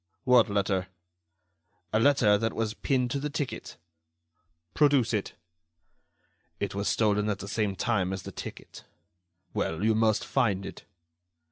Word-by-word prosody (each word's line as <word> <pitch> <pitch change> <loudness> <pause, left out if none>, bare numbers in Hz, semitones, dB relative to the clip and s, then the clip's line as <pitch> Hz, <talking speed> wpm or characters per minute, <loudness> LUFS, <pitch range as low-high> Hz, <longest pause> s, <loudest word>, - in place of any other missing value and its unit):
"What 125 -3 +5
letter?" 100 -2 0 1.1
"A 110 - +3
letter 120 -5 +4
that 115 +2 -1
was 110 -1 -2
pinned 125 0 0
to 140 - -1
the 150 +2 -3
ticket." 145 -1 -5 1.0
"Produce 140 -6 +3
it." 105 -2 -2 1.3
"It - - -2
was 100 +1 -2
stolen 105 -1 +2
at 105 - -1
the 100 +1 -8
same 100 -1 -1
time 95 -3 0
as 95 -1 -4
the - - -7
ticket." - - -9 0.7
"Well, 80 +4 -2
you 110 - +4
must 110 -1 +2
find 100 -5 0
it." - - -9
110 Hz, 140 wpm, -28 LUFS, 100-120 Hz, 1.3 s, What